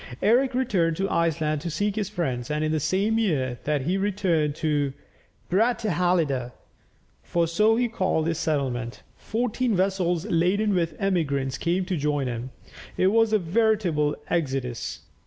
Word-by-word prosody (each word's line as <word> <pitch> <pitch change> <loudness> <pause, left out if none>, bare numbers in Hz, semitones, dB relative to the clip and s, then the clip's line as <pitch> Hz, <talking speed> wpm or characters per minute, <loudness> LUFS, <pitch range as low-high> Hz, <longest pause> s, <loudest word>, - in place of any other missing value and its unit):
Eric 250 +4 +3
returned 185 -11 +1
to 195 - 0
Iceland 160 -3 0
to 170 - -4
seek 200 +6 -1
his 210 -3 -2
friends, 130 - -3
and 150 +1 -1
in 155 - 0
the 155 - +1
same 195 +9 +1
year 135 - 0
that 150 -1 +1
he 180 +7 0
returned 185 -7 0
to 145 -4 0 0.5
Brattahalida 180 - +1 0.7
(for 170 -1 0
so 210 +7 +3
he 245 +1 +1
called 185 -8 0
his 165 -1 -1
settlement), 130 -7 -2
fourteen 235 0 -1
vessels 185 -2 0
laden 200 +3 +1
with 170 -3 0
emigrants 140 -9 0
came 180 +2 0
to 185 -1 -2
join 145 -1 0
him. 120 0 -4 0.5
It 185 +1 +3
was 225 0 +3
a 215 - +5
veritable 180 -6 +1
exodus. 135 -7 -2
170 Hz, 150 wpm, -25 LUFS, 150-205 Hz, 0.7 s, a